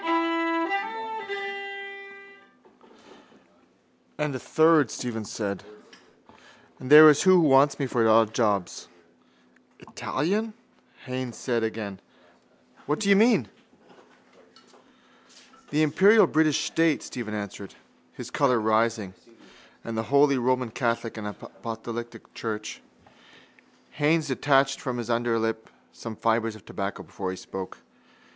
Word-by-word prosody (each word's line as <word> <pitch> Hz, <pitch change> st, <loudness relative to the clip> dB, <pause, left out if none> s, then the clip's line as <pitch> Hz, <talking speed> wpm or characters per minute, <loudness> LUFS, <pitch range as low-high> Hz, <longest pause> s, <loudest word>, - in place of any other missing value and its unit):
—And 150 Hz, -1 st, -2 dB
a -, -, -4 dB
third, 155 Hz, -2 st, +3 dB
Stephen 115 Hz, -3 st, -5 dB
said, 100 Hz, -2 st, -4 dB, 1.2 s
there 150 Hz, +4 st, +9 dB
is 150 Hz, -1 st, +4 dB
who 185 Hz, -1 st, +6 dB
wants 140 Hz, -2 st, +4 dB
me 140 Hz, -, -1 dB
for 120 Hz, -3 st, +1 dB
odd 110 Hz, 0 st, +4 dB
jobs. 105 Hz, -5 st, -1 dB, 0.9 s
—Italian? 210 Hz, +10 st, -3 dB, 0.5 s
Haines 130 Hz, -2 st, -5 dB
said 120 Hz, -3 st, -1 dB
again. 110 Hz, -3 st, -4 dB, 0.9 s
What 150 Hz, +2 st, 0 dB
do 200 Hz, -, 0 dB
you 200 Hz, -, +7 dB
mean? 210 Hz, -, +4 dB, 2.2 s
—The 150 Hz, +2 st, +1 dB
imperial 195 Hz, +9 st, +5 dB
British 155 Hz, -2 st, +1 dB
state, 165 Hz, -2 st, +1 dB
Stephen 110 Hz, -4 st, -6 dB
answered, 100 Hz, -1 st, -7 dB, 0.4 s
his -, -, -9 dB
colour 125 Hz, -4 st, +2 dB
rising, 110 Hz, -2 st, 0 dB, 0.7 s
and 115 Hz, -, -6 dB
the 110 Hz, -, -1 dB
holy 140 Hz, -1 st, +4 dB
Roman 125 Hz, -1 st, 0 dB
catholic 115 Hz, -1 st, -2 dB
and 105 Hz, -2 st, -6 dB
apostolic 115 Hz, +2 st, -8 dB
church. 110 Hz, -1 st, -5 dB, 1.1 s
Haines 150 Hz, +1 st, +1 dB
detached 135 Hz, 0 st, +2 dB
from 125 Hz, -2 st, -3 dB
his 120 Hz, 0 st, -4 dB
underlip 115 Hz, -1 st, -1 dB, 0.2 s
some 115 Hz, -2 st, -8 dB
fibres 115 Hz, 0 st, 0 dB
of 110 Hz, -, -15 dB
tobacco 100 Hz, -1 st, -5 dB
before 95 Hz, -2 st, -6 dB
he 95 Hz, -, -5 dB
spoke. 95 Hz, 0 st, -8 dB
120 Hz, 105 wpm, -26 LUFS, 110-145 Hz, 2.2 s, there